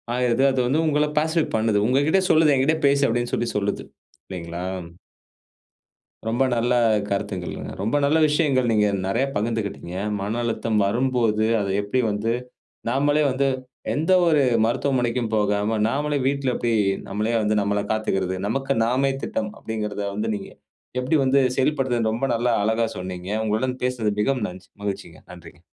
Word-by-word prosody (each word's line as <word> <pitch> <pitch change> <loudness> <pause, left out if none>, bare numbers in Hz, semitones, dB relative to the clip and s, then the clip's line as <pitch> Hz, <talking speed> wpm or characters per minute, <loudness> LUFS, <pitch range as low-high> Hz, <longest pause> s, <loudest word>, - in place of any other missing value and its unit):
ஆகிருது. 125 +1 +2
அது 130 - -1
வந்து 145 +6 +2
உங்கள 150 0 +2
பேசிஃபிக் 160 +1 0
பண்ணுது. 110 -2 +2
உங்ககிட்ட 145 +9 +3
சொல்லுது, 155 -2 +5
"என்கிட்டே 140 +4 +2
பேசு" 140 0 +3
அப்பிடீன்னு 120 +1 -1
சொல்லி 120 - -1
சொல்லுது. 100 0 -1 0.4
இல்லைங்களா? 85 -1 -6 1.6
ரொம்ப 120 +4 +1
நல்ல 120 +1 +1 0.4
கருத்துகளுங்க. 100 -3 -4
ரொம்ப 110 +8 0
நல்ல 150 +3 +3
விஷயங்கள், 145 -4 +2
நீங்க 105 -1 +3 0.2
நிறைய 115 +7 +1
பகிர்ந்துகிட்டீங்க. 105 -5 -3 0.3
மன 105 +4 -2
அழுத்தம் 115 -1 -1
வரும்போது, 115 0 +1 0.2
அத 100 -1 -2
எப்பிடி 105 +5 0
வந்து 105 +2 -1 0.6
நாமலே 145 +4 +2
வந்து, 135 +2 +1 0.5
எந்த 155 +5 0 0.2
ஒரு 155 -3 +4 0.2
மருத்துவமனைக்கும் 120 -1 0
போகாம, 105 +1 +1
நாமலே 145 +4 0
வீட்ல 135 -2 0
எப்படி 120 -1 0 0.4
நம்மளே 105 +4 -1
வந்து 105 0 +1
நம்மை 100 0 0
காத்துக்கிறது. 95 -4 -1
நமக்கு 135 +4 -1
நாமே 130 +3 +1
திட்டம். 110 -1 -3
அப்பிடீங்கிறத 105 -2 -4
வந்து 110 +2 -2
நீங்க 100 - -7 0.5
எப்படி 125 +5 0
வந்து 135 +1 +3 0.2
செயல்படுத்துறதுனு 130 -5 +1
ரொம்ப 120 +5 -1
நல்ல 120 +2 0 0.2
அழகா 110 +2 +1
சொன்னீங்க. 90 0 -6 0.2
உங்களுடன் 125 +4 -1
பேசிறது 120 -5 0
மிகவும் 125 0 0
நன்றி 90 0 -12
மகிழ்ச்சிங்க. 100 -5 -5
நன்றிங்க. 90 -1 -14
115 Hz, 140 wpm, -23 LUFS, 105-135 Hz, 1.6 s, சொல்லுது